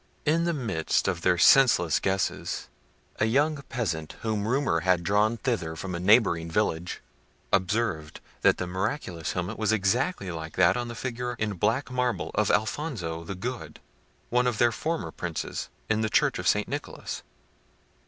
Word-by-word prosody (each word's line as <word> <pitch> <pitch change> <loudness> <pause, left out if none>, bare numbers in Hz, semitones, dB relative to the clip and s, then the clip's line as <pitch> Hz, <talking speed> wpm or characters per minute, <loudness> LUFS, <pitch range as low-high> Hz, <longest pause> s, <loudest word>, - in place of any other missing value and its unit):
In 165 +3 +2
the 170 - +2
midst 110 - 0
of 90 -3 -1
their 90 0 +3
senseless 90 - +5
guesses, 95 -1 -2 0.5
a - - +2
young 145 +5 +2
peasant, 80 -10 -3
whom 110 -2 -1
rumour 125 -9 +1
had 90 0 +2
drawn 105 +5 +2
thither 100 -11 -2
from 90 +3 -5
a 85 - -3
neighbouring 90 -4 +4
village, 80 +1 -1 0.5
observed 95 -5 0 0.2
that - - +4
the 90 - -2
miraculous 90 - -3
helmet 90 +5 -3
was 110 -1 +2
exactly 110 - 0
like 80 -1 -7
that 90 -2 +4
on 120 -1 -2
the 120 - -6
figure 125 0 -3
in 110 -2 -1
black 120 +9 0
marble 125 -1 -1
of 105 -1 +1
Alfonso 105 - -1
the 95 +4 -6
Good, 125 +7 -6 0.5
one 125 +1 +3
of 120 -3 0
their 120 +1 +4
former 160 +7 -3
princes, 85 -3 -4 0.2
in 110 0 +1
the 110 - 0
church - - +2
of - - -2
St. - - +2
Nicholas. - - -5
105 Hz, 165 wpm, -27 LUFS, 90-125 Hz, 0.5 s, senseless